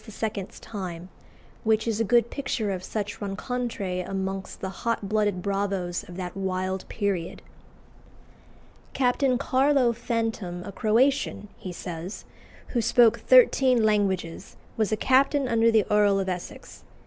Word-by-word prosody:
's 215 -3 -5
time, 185 -5 -7 0.5
which 220 0 +2
is 225 -1 0
a - - +3
good 235 +1 +3
picture 230 -7 -2
of 185 -1 -4
such 205 +1 -4
rencontres 200 -2 -3
amongst 195 0 -4
the 190 - -4
hot 230 -3 -1
blooded 205 -3 0
bravos 195 -3 -1
of 175 - -9
that 180 -1 -5
wild 185 -1 -3
period. 195 -5 -2 1.5
"Captain 255 0 +2
Carlo 265 -2 +2
Fantom, 225 -7 -3
a 200 - -7
Croatian," 230 +1 +1
he 185 - -7
says, 175 +2 -7 0.4
"who 240 - 0
spoke 230 0 +4
thirteen 255 0 +5
languages, 195 -5 -1 0.2
was 220 -2 0
a 215 - +1
captain 270 +3 +3
under 230 -1 +3
the 220 -3 +3
Earl 205 -1 +4
of 190 - -2
Essex. 180 -1 -6
210 Hz, 135 wpm, -26 LUFS, 190-235 Hz, 1.5 s, thirteen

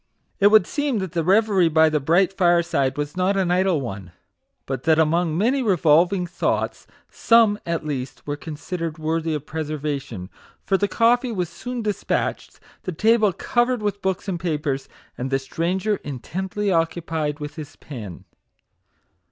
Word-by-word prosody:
It 200 - +6
would 215 -3 +6
seem 290 -5 -1
that 190 -4 -3
the 165 -1 -1
reverie 195 -1 +3
by 160 0 +5
the 155 -1 +1
bright 170 +7 +2
fireside 170 -7 +2
was 145 +1 -3
not 185 +2 +1
an 185 -2 +1
idle 180 -4 +2
one, 95 -8 -7 0.5
but 130 -2 -3
that 160 -1 +4
among 160 +1 +2
many 250 +8 +2
revolving 180 -2 +3
thoughts, 175 0 -2 0.2
some, 225 -3 +4
at 165 -2 -2
least, 135 -4 -5
were 145 - -2
considered 160 +2 -5
worthy 160 0 -1
of 150 -1 -5
preservation; 145 - -4 0.3
for 195 - +2
the 205 +1 +1
coffee 240 +5 +2
was 180 -6 -2
soon 245 +6 -6
despatched, 210 -2 -2 0.2
the 185 - -4
table 215 +4 +3
covered 240 +5 0
with 205 -1 -2
books 190 0 -2
and 180 -3 -2
papers, 150 -5 -2 0.3
and 130 +2 -2
the 135 - +2
stranger 180 +9 -1
intently 190 - -4
occupied 165 -3 -1
with 150 0 -6
his 155 -2 -9
pen. 110 - -9
170 Hz, 155 wpm, -23 LUFS, 150-195 Hz, 0.5 s, It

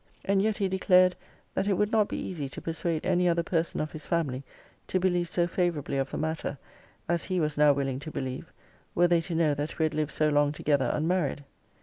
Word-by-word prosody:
And 195 0 +3
yet 215 +1 +1
he 195 - +1
declared, 185 -1 +4 0.4
that 195 - -1
it 205 - +3
would 210 +3 +1
not 215 -2 +3
be - - -4
easy 150 -7 -4
to - - -7
persuade 165 -1 -2
any 180 -1 +3
other 170 0 +1
person 165 0 -1
of 155 - -2
his 155 - -6
family 140 -6 -1 0.4
to 185 - +1
believe 175 -2 +1
so 175 0 +2
favourably 170 -6 -1
of 135 0 -1
the - - -5
matter, 160 -2 -2 0.5
as 170 0 +1
he 185 -1 -1
was 150 -2 0
now 150 0 +6
willing 135 -2 -1
to 150 +3 -7
believe, 130 -3 -5 0.4
were 175 +1 +5
they 170 -1 +3
to 165 0 -5
know 160 -3 +3
that 145 +2 -4
we 160 - +1
had 155 - -1
lived 150 -1 -1
so 155 0 +2
long 145 0 +2
together 145 -3 +1
unmarried. 155 -2 0
165 Hz, 225 wpm, -28 LUFS, 145-180 Hz, 0.5 s, now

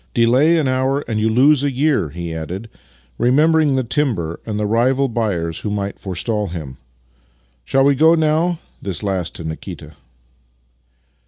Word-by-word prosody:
Delay 130 +8 +4
an 155 -4 +1
hour, 130 +2 0
and 110 -2 -1
you 110 +1 +2
lose 135 +5 +4
a 145 - +2
year," 135 - +1
he 85 +2 -6
added, 90 +8 -6 0.5
remembering 150 +4 +3
the 130 - +1
timber 110 - -1
and 105 -1 -3
the 105 - 0
rival 125 +5 +2
buyers 100 -9 -2
who 105 - -4
might 100 -1 -3
forestall 100 +3 -2
him, 75 -7 -7 0.4
" - - -40
Shall 135 0 +2
v/e 140 - +5
go 160 +4 +5
now? 160 +2 +1
" - - -37
(this 100 0 -4
last 95 -4 -2
to - - -7
Nikita). 80 -1 -7
115 Hz, 165 wpm, -19 LUFS, 90-140 Hz, 0.5 s, v/e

